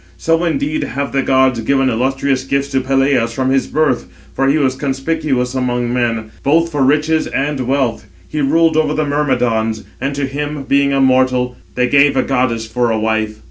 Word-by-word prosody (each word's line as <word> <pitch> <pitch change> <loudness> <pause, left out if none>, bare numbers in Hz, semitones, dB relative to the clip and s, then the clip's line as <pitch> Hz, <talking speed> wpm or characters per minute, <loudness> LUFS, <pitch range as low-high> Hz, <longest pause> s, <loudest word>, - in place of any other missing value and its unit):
So 165 +1 +1
indeed 285 - -1
have 140 0 -3
the 135 - +1
gods 130 -2 +2
given 135 +4 +1
illustrious 130 +2 0
gifts 140 +1 -1
to 135 -1 0
Peleus 135 -3 +1
from 130 +1 -1
his 135 -1 +1
birth; 150 -5 0 0.3
for 135 - 0
he 140 +3 +3
was 135 -4 +1
conspicuous 135 -2 -2
among 125 -2 -1
men, 115 -3 -1
both 165 +4 +2
for 145 -2 -1
riches 155 +3 +2
and 140 0 -2
wealth, 130 -6 -1
and 100 - -26 0.2
he 150 - -3
ruled 160 +3 +2
over 150 -1 +1
the 155 - 0
Myrmidons, 125 -6 0 0.2
and 140 +1 -2
to 140 0 -1
him, 145 +1 -4
being 140 +1 +2
a 140 - +1
mortal, 130 -1 +2 0.2
they 125 0 +1
gave 140 +1 +4
a - - +3
goddess 125 -4 0
for 120 +2 -1
a 110 - 0
wife. 110 0 -1
135 Hz, 190 wpm, -16 LUFS, 125-145 Hz, 0.3 s, gave